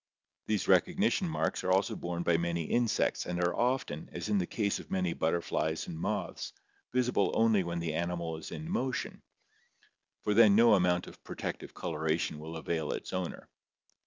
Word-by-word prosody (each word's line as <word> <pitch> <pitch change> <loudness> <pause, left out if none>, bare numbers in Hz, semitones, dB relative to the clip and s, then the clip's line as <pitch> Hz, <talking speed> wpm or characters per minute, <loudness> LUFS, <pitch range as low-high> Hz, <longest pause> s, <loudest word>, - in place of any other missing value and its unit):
These 105 -2 0
recognition 180 - +3
marks - - -1
are 95 - +1
also 95 +1 +2
borne 85 0 -3
by 85 - +3
many 85 0 -1
insects 120 +6 +1
and 90 0 -2
are 90 0 +1
often, 120 - -1
as 90 +4 -5
in 105 -1 +3
the 90 - -1
case 100 -3 0
of - - -11
many 90 -3 0
butterflies 80 -1 0
and 85 - -6
moths, 80 - -3 0.4
visible 125 -5 +2
only 110 -3 +4
when 85 0 -3
the 85 -2 -2
animal 85 0 -2
is 80 - -8
in 155 - -6
motion, 135 -9 -2 1.0
for 105 - +1
then 105 -2 +7
no 115 +1 +7
amount 90 -2 +3
of - - -13
protective - - -5
coloration 80 -1 -1
will 80 +2 -6
avail 80 -1 -2
its - - -5
owner. 95 -2 -4
90 Hz, 170 wpm, -31 LUFS, 85-110 Hz, 1.0 s, then